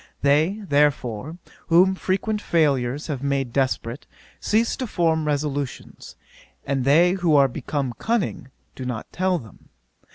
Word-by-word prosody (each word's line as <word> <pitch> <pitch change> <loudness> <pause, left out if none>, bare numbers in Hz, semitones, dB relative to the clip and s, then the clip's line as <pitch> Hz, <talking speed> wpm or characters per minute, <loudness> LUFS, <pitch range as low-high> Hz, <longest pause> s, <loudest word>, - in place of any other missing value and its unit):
They, 155 +9 +2
therefore, 145 -1 0 0.3
whom 180 +3 +5
frequent 200 +3 -1
failures 140 -5 +1
have 140 -5 -4
made 140 -3 -1
desperate, 130 -1 -1 0.3
cease 225 +2 +1
to 255 - -3
form 160 -5 0
resolutions; 145 -2 -4 0.5
and 135 -2 -1
they 165 +6 +5
who 175 -5 +2
are 140 -1 +6
become 135 0 -3
cunning, 225 - -1 0.3
do 130 - -7
not 125 -3 -5
tell 185 0 +1
them. 110 - -14
150 Hz, 130 wpm, -23 LUFS, 135-180 Hz, 0.5 s, are